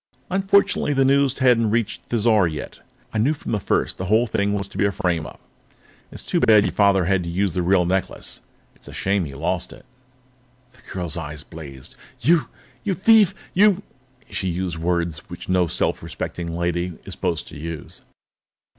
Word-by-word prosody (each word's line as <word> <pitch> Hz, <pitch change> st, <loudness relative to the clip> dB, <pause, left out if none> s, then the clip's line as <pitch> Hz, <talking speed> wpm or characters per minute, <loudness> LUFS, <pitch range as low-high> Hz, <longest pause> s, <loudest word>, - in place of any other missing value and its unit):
Unfortunately, 195 Hz, -5 st, +2 dB
the 135 Hz, -1 st, +3 dB
news 140 Hz, 0 st, +3 dB
hadn't 120 Hz, -4 st, +4 dB
reached 115 Hz, 0 st, -2 dB
Thizar 110 Hz, -4 st, +3 dB
yet. 75 Hz, -, -7 dB, 0.3 s
I 110 Hz, -, 0 dB
knew 140 Hz, +8 st, +2 dB
from -, -, -7 dB
the 105 Hz, -, +1 dB
first -, -, 0 dB
that -, -, -2 dB
the -, -, -4 dB
whole 110 Hz, +4 st, +4 dB
thing 100 Hz, -2 st, 0 dB
was 100 Hz, -1 st, -3 dB
to -, -, -8 dB
be 100 Hz, -, +3 dB
a 100 Hz, -, +2 dB
frame 85 Hz, -4 st, -1 dB
up. -, -, -13 dB, 0.7 s
It's -, -, -7 dB
too -, -, 0 dB
bad 125 Hz, -, +2 dB
that 105 Hz, -2 st, +7 dB
your -, -, 0 dB
father 100 Hz, -3 st, +4 dB
had 95 Hz, 0 st, +2 dB
to 85 Hz, -, -5 dB
use 95 Hz, +1 st, 0 dB
the 90 Hz, -, 0 dB
real 90 Hz, 0 st, +3 dB
necklace 95 Hz, +2 st, -2 dB, 0.3 s
it's -, -, -17 dB
a -, -, -10 dB
shame 95 Hz, -2 st, 0 dB
he 70 Hz, -2 st, -8 dB
lost 70 Hz, -, -2 dB
it." -, -, -14 dB, 0.9 s
The 130 Hz, -, -21 dB
girl's 85 Hz, -4 st, -4 dB
eyes 75 Hz, -2 st, -6 dB
blazed. 70 Hz, -6 st, -11 dB, 0.2 s
"You 165 Hz, 0 st, +3 dB, 0.4 s
you 190 Hz, -, 0 dB
thief! 215 Hz, +1 st, +5 dB, 0.2 s
You 200 Hz, 0 st, +4 dB, 0.2 s
" 130 Hz, -1 st, -33 dB
She 95 Hz, -, -2 dB
used 90 Hz, -1 st, -2 dB
words 85 Hz, -1 st, -1 dB
which 90 Hz, 0 st, -9 dB
no 90 Hz, -1 st, +2 dB
self -, -, 0 dB
respecting 85 Hz, -1 st, -5 dB
lady 85 Hz, +1 st, -1 dB
is -, -, -6 dB
supposed 85 Hz, -3 st, -2 dB
to -, -, -10 dB
use. 80 Hz, -1 st, -7 dB
95 Hz, 195 wpm, -22 LUFS, 85-125 Hz, 0.9 s, that